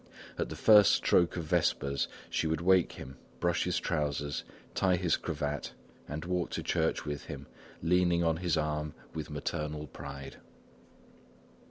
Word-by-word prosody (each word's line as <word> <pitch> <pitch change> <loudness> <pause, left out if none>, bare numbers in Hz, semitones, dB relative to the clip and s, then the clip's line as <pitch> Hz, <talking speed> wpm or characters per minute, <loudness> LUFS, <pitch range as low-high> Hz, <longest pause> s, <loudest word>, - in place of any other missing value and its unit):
At - - -1
the - - -5
first 105 -2 +7
stroke 85 0 +3
of 85 - -2
vespers, 70 -2 +1 0.2
she 80 - 0
would 80 -1 0
wake 90 0 +4
him 65 0 -9
up, - - -27
brush 85 0 +1
his 90 - 0
trousers, 75 -3 -1 0.3
tie 95 -1 +3
his 85 -2 +2
cravat 75 -1 -3 0.3
and 75 +3 -5
walk 90 -1 -1
to - - -3
church - - 0
with 75 -1 -4
him, - - -7 0.4
leaning 85 0 +3
on 80 -1 +2
his 85 -2 0
arm 75 0 -1 0.2
with 80 -2 -5
maternal 75 0 -3
pride. 70 -1 -8
80 Hz, 155 wpm, -31 LUFS, 75-85 Hz, 0.4 s, first